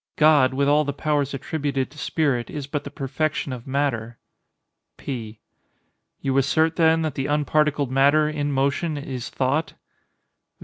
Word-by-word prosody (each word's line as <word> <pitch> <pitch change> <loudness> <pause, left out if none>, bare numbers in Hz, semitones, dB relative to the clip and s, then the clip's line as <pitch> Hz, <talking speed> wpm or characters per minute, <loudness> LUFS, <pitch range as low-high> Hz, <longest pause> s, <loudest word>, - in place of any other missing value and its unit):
God, 150 -4 +4
with 140 +1 +1
all 150 +1 +4
the 140 -1 -3
powers 145 -1 0
attributed 135 -1 -2
to 150 - -17
spirit, 140 -7 0
is 145 -2 -5
but 145 +1 -4
the - - -5
perfection 140 0 -2
of 120 0 -8
matter. 125 -4 -1 0.8
P. 115 -5 -6 0.8
You 135 -1 -1
assert, 160 +4 +2
then, 160 -1 +3
that 155 -3 -2
the 135 +1 -3
unparticled 150 -1 +1
matter, 140 +3 +4
in 145 -1 -2
motion, 140 +4 0
is 130 -3 -5
thought? 140 +5 -1
140 Hz, 145 wpm, -23 LUFS, 135-150 Hz, 0.8 s, God